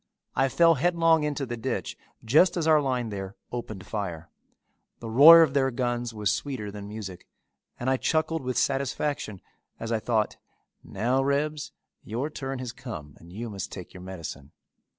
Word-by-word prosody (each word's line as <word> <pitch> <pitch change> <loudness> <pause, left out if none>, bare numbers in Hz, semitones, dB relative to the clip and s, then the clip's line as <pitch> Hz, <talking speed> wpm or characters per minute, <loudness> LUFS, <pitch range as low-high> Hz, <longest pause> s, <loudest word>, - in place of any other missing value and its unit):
I 135 +1 +3
fell 165 +4 +5
headlong 165 -2 +4
into 150 -2 -2
the 120 -1 -4
ditch 115 - -3 0.3
just 155 +11 +4
as 165 - 0
our 155 -2 +5
line 125 -4 -1
there 95 -1 -6 0.2
opened 110 -5 -6
fire. 90 -7 -5 0.7
The 115 -1 -6
roar 165 +7 +10
of 145 -4 0
their 135 -2 +3
guns 120 -1 -2
was 105 -3 0
sweeter 125 -8 -3
than 100 0 -8
music 105 -4 -8 0.5
and 120 - -4
I 130 0 +3
chuckled 160 +3 0
with 130 -1 -3
satisfaction 135 -6 -1 0.4
as 115 0 -4
I 115 - +1
thought, 110 -2 0 0.5
"Now, 120 +7 0
Rebs, 145 +2 -1 0.3
your 125 +8 -3
turn 135 -2 -4
has 125 -2 -5
come 110 - -8
and 85 +1 -15
you 115 +6 -5
must 100 -4 -6
take 90 - -9
your 90 - -10
medicine." 85 -7 -8
120 Hz, 170 wpm, -27 LUFS, 105-140 Hz, 0.7 s, roar